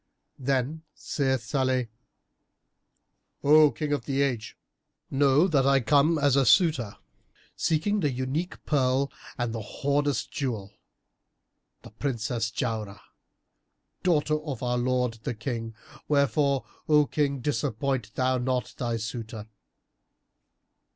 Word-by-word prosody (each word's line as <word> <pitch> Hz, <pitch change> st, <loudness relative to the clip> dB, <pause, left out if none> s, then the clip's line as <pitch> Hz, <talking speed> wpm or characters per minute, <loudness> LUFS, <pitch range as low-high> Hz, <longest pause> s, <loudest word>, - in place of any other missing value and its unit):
Then 135 Hz, +3 st, -1 dB
said 130 Hz, -3 st, -1 dB
Salih,[FN#325] 130 Hz, 0 st, 0 dB, 1.6 s
"O 150 Hz, +1 st, +7 dB
King 150 Hz, 0 st, -3 dB
of 145 Hz, -, -2 dB
the 140 Hz, 0 st, +1 dB
Age, 125 Hz, -6 st, -3 dB, 0.5 s
know 140 Hz, +4 st, +4 dB
that 140 Hz, -6 st, +2 dB
I 135 Hz, 0 st, +5 dB
come 145 Hz, +5 st, +3 dB
as 145 Hz, -3 st, +3 dB
a 140 Hz, -, +4 dB
suitor, 135 Hz, -, +3 dB, 0.6 s
seeking 185 Hz, +7 st, +1 dB
the 150 Hz, -6 st, +1 dB
unique 130 Hz, +8 st, -3 dB
pearl 135 Hz, -1 st, +1 dB, 0.3 s
and 120 Hz, -3 st, -2 dB
the 115 Hz, -, -4 dB
hoarded 145 Hz, +6 st, 0 dB
jewel, 110 Hz, -8 st, -3 dB, 1.1 s
the -, -, -12 dB
Princess 115 Hz, -2 st, -2 dB
Jauharah, 110 Hz, -4 st, -3 dB, 1.0 s
daughter 155 Hz, -3 st, +2 dB
of 140 Hz, -6 st, -5 dB
our 125 Hz, 0 st, 0 dB
lord 125 Hz, -2 st, 0 dB
the 115 Hz, -, -3 dB
King; 115 Hz, -1 st, -4 dB, 0.3 s
wherefore, 140 Hz, -2 st, +2 dB, 0.2 s
O 150 Hz, -1 st, +6 dB
King 140 Hz, -2 st, 0 dB
disappoint 125 Hz, -2 st, -2 dB
thou 130 Hz, 0 st, +1 dB
not 125 Hz, 0 st, -1 dB
thy 120 Hz, -3 st, -1 dB
suitor." 110 Hz, 0 st, -6 dB
130 Hz, 115 wpm, -27 LUFS, 120-145 Hz, 1.6 s, O